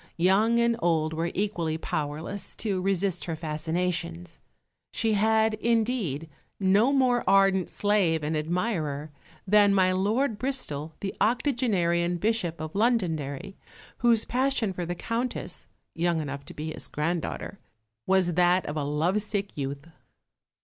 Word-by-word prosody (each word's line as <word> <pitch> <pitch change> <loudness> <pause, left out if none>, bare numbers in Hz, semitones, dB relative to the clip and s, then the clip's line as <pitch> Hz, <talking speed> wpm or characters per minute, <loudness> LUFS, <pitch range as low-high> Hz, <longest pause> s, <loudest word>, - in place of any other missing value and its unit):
Young 200 +7 +3
and 235 0 +3
old 160 -3 +1
were 165 +2 -1
equally 175 -6 -1
powerless 155 +5 -4
to 200 -4 -2
resist 195 -1 0
her 165 - -3
fascinations. 155 - -3 0.5
She 225 -1 +1
had, 220 +1 +3
indeed, 215 - 0 0.3
no 200 +6 +4
more 255 -3 +3
ardent 195 -1 +4
slave 190 -7 +1
and 155 +2 -1
admirer 155 -3 -2 0.3
than 205 0 +5
my 185 -1 +4
Lord 210 +5 0
Bristol, 160 - -3
the 195 - -3
octogenarian 200 - +1
Bishop 185 -4 -1
of 155 0 -5
Londonderry, 190 - -1 0.4
whose 235 -2 +3
passion 255 -5 +1
for 175 -2 -4
the 175 - -2
Countess, 230 +7 -3 0.3
young 170 0 0
enough 140 -2 -5
to - - -11
be 155 +1 -4
his - - -4
granddaughter, 170 +5 -3 0.5
was 185 -2 +3
that 180 +2 +3
of 150 - -4
a 150 - -1
lovesick 195 +7 -1
youth. 140 0 -4
185 Hz, 130 wpm, -27 LUFS, 160-215 Hz, 0.5 s, than